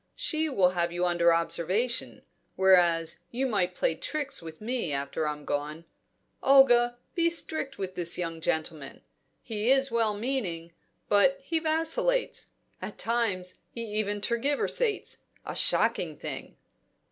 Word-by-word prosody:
She 315 -1 0
will 190 -10 +3
have 170 -1 0
you 175 +1 -1
under 175 -1 +3
observation; 170 +8 0 0.3
whereas 175 -3 +3
you 255 +3 -2
might 195 -7 0
play - - +1
tricks 300 -3 -3
with 160 -1 -10
me 230 -6 -2
after 140 +2 -2
I'm 150 -1 -5
gone. 150 +3 -3 0.6
Olga, 245 -3 +5 0.2
be 335 -1 +2
strict 315 -4 -1
with 190 -1 -4
this 175 -2 +2
young 165 -2 -4
gentleman. 160 -3 -3 0.4
He 220 0 -2
is 270 -1 +4
well 225 -2 +1
meaning, 200 -9 -3 0.3
but 270 +7 +4
he 320 +4 -1
vacillates; 325 +11 0 0.3
at - - -7
times 210 -6 -1
he 235 - -6 0.2
even 205 -1 -2
tergiversates 285 - 0 0.3
a - - -5
shocking - - +2
thing." - - -6
210 Hz, 135 wpm, -28 LUFS, 170-270 Hz, 0.6 s, Olga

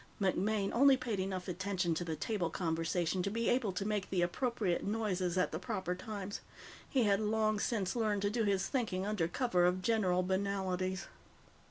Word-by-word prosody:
MacMaine 195 +1 +1
only 270 +2 +6
paid 230 -6 -3
enough 185 -1 -3
attention 185 -1 -1
to 160 - -2
the 160 -2 -3
table 180 +1 -1
conversation 165 +1 -1
to 195 - -1
be 230 +3 -1
able 240 -5 +2
to 185 +2 -3
make 210 -3 -1
the 180 -2 +1
appropriate 205 -1 0
noises 195 -4 -1
at 185 - +2
the 160 - -3
proper 180 -1 -2
times. 200 +1 -6 0.5
He 260 -3 +2
had 200 -2 +3
long 215 0 +1
since 200 -4 -1
learned 210 -4 0
to 205 - +1
do 230 0 +1
his 195 -2 +1
thinking 210 -8 -1
under 205 -6 0
cover 180 -2 +1
of 180 +1 +2
general 185 -5 +2
banalities. 190 -1 -1
195 Hz, 180 wpm, -34 LUFS, 180-215 Hz, 0.5 s, only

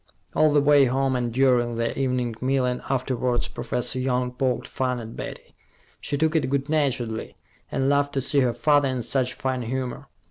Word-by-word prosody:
All 155 -1 +4
the 145 0 +4
way 145 -1 +6
home 130 +1 +1
and 120 -1 -1
during 120 -2 +2
their 115 0 0
evening 125 -3 -1
meal 130 0 +1
and 125 0 -1
afterwards, 125 -2 0
Professor 125 +1 -3
Young 125 -1 0
poked 125 0 -1
fun 125 -1 -2
at 115 -1 -8
Betty. - - -8 0.5
She 145 - -3
took 160 +2 +1
it 145 -5 +1
good 140 +1 -1
naturedly, 130 -7 -1 0.4
and 135 0 0
laughed 145 0 +2
to 135 - +1
see 140 +2 +1
her 125 -3 +3
father 145 +2 +3
in 130 -2 -2
such 125 +1 0
fine 130 -1 -2
humor. 125 +1 -4
130 Hz, 185 wpm, -24 LUFS, 125-135 Hz, 0.5 s, way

